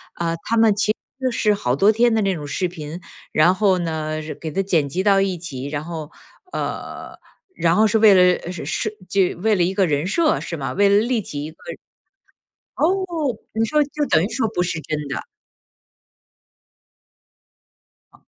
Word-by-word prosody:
啊， 165 -1 -1
他 230 - 0
们 225 -2 +5
其 210 +1 +2
实 - - -4 0.2
就 255 -1 +1
是 215 -2 +2
好 125 -12 -1
多 195 +10 +4
天 230 +2 +3
的 220 - +2
那 195 -1 +1
种 150 -3 -6
视 145 +6 -1
频， 165 -1 -7 0.3
然 175 +4 +4
后 195 -2 +3
呢 155 -2 -3
惹 155 0 -6
给 160 - -6
它 195 - 0
剪 165 -7 +1
辑 180 +7 -1
到 195 0 +4
一 190 -2 0
起， 140 -6 -6
然 145 0 -3
后 160 -2 -6 0.4
呃， - - -5 0.4
然 165 -1 +2
后 220 0 +5
是 220 - +2
为 215 -2 +7
了， 185 - +6 0.2
呃， - - -8
呃， 180 - -6
设 215 - -1 0.2
这 190 +1 +2
为 210 +4 +1
了 180 - +2
一 180 +2 0
个 190 -2 +2
人 145 +2 0
设 315 - +1
是 170 - -5
吗？ 135 -2 -4
为 200 +1 +3
了 200 - +5
立 230 +1 +1
起 145 -5 -6
一 155 - -6
个 160 - -15 1.2
哦， - - +2 0.7
你 225 +1 +1
说 300 +6 +2
就 290 +1 -3
等 160 -8 +3
于 195 - -2
说 225 -1 0
不 180 - 0
是 175 -2 -1
真 155 +2 -3
的。 140 - -3 2.9
哦。 - - -23
185 Hz, 210 characters per minute, -21 LUFS, 160-215 Hz, 2.9 s, 为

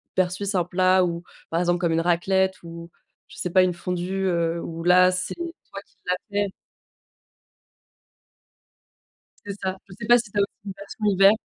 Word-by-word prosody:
versus 185 +2 0
un 180 - +3
plat 185 +1 +3
ou 170 0 -3 0.3
par 165 - +1
exemple, 175 0 +2
comme 170 -2 +1
une 165 0 +2
raclette 190 +2 +2
ou 170 0 -9 0.4
je - - -14
sais 180 - -2
pas, 185 +2 +5
une 180 -1 +1
fondue, 180 +2 -3
heu, 170 -2 0
où 165 0 -6
là, 180 +1 +6
c'est 185 0 -3
toi 335 - -8
qui 225 - -33
l'as 180 - +1 0.2
fait. 205 0 +1 3.0
C'est 200 - -4
ça. 190 0 -2
Je 190 - -12
sais 210 - -5
pas 240 0 +7
si 230 -3 -5
tu 205 - -5
as - - +5
aussi 200 - +2 0.2
une 195 - -5
version 200 +2 -7
hiver 195 -1 +6
185 Hz, 185 wpm, -24 LUFS, 175-195 Hz, 3.0 s, pas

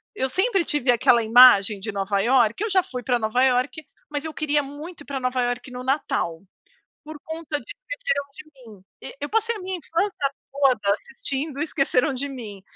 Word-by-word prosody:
eu 265 -6 -1
sempre 385 - +1
tive 265 -4 +1
aquela 235 0 +4
imagem 220 -3 +7
de 220 +2 -5
Nova 195 0 -1
Iorque 245 - +3
Eu 445 - -1
já 380 -1 +4
fui 250 -9 -7
pra 245 -2 +1
Nova 225 +4 +1
Iorque, 260 +4 +1 0.2
mas 295 +1 -4
eu 315 - -5
queria 295 -1 0
muito 295 +4 -9
ir - - -12
pra 275 -1 -4
Nova 255 0 -1
Iorque 245 +1 -3
no 250 0 -7
Natal, 255 - -1 0.6
por 310 0 -9
conta 320 -2 -4
de 230 - -16
Esqueceram - - -3
de 310 +1 -11 0.3
Mim. 200 -3 -14 0.2
E - - -9
eu 290 - -3
passei 450 +1 0
a - - -7
minha 370 0 -4
infância 330 -3 -1 0.2
toda 270 -4 +2
assistindo 300 - -5
Esqueceram 280 -3 +1
de 280 +2 -4
Mim. 215 -7 -8
275 Hz, 195 wpm, -23 LUFS, 245-320 Hz, 0.6 s, imagem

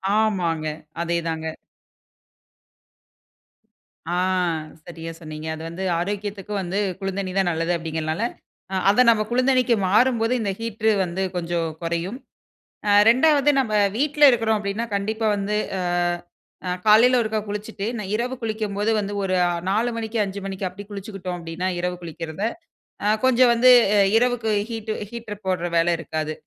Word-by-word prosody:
ஆமாங்க. 180 -8 +1 0.4
அதே 170 0 0
தாங்க. 160 0 -4 2.6
ஆ, - - +1 0.7
சரியா 165 -1 -7
சொன்னீங்க. 155 -1 -7
அது 160 - -9
வந்து, 175 +3 -6 0.2
ஆரோக்கியத்துக்கு 205 +2 -4
வந்து, 185 +2 -2 0.2
குளுந்தண்ணி 195 -1 -3
தான் 190 -2 +3
நல்லது 165 +1 -1
அப்டிங்கிறதுனால, 160 +3 -3 0.5
அ - - 0
அத 205 +5 +5
நம்ம, 215 -2 +4
குளுந்தண்ணிக்கு 255 -1 +3
மாறும்போது, 230 +2 +3
இந்த 200 - -1
ஹீட்ரு 220 -1 0
வந்து, 180 +2 -4
கொஞ்சோம் 170 -1 -1
கொறையும். 170 +8 -3 0.7
ஆ, - - +4 0.2
2வது 285 +4 +5
நம்ம 225 -5 -2 0.2
வீட்ல 295 +3 -1
இருக்கிறோம் 225 -3 +1
அப்டின்னா, 205 +3 -2
கண்டிப்பா 220 +3 -2
வந்து. 205 +1 -1 1.1
ஆ 180 - -1 0.2
காலையில 240 +4 +6
ஒருக்கா 220 -1 -1
குளிச்சிட்டு, 210 0 -5
நை 210 - -4
இரவு 245 +3 -2
குளிக்கும்போது 215 -1 -2
வந்து, 205 0 -4
ஒரு 185 -1 0
அ - - +2 0.2
4 225 +4 +1
மணிக்கு 225 0 -3
5 200 0 -5
மணிக்கு, 195 0 -4
அப்டி 195 +3 -10
குளிச்சுக்குட்டோம் 195 -3 -6
அப்டின்னா, 170 +2 -4
இரவு 180 0 -2
குளிக்கிறத. 165 +1 -6 0.6
ஆ, 205 - +1 0.2
கொஞ்சோம் 255 -1 +5
வந்து, 250 +2 +6 0.2
அ - - +4 0.2
இரவுக்கு 240 -2 +1 0.2
ஹீட்ட் 225 -1 -4 0.2
ஹீட்டர் 220 -3 -8
போட்ற 180 -2 0
வேல 165 +1 +3
இருக்காது. 155 -1 -3
205 Hz, 140 wpm, -23 LUFS, 175-225 Hz, 2.6 s, காலையில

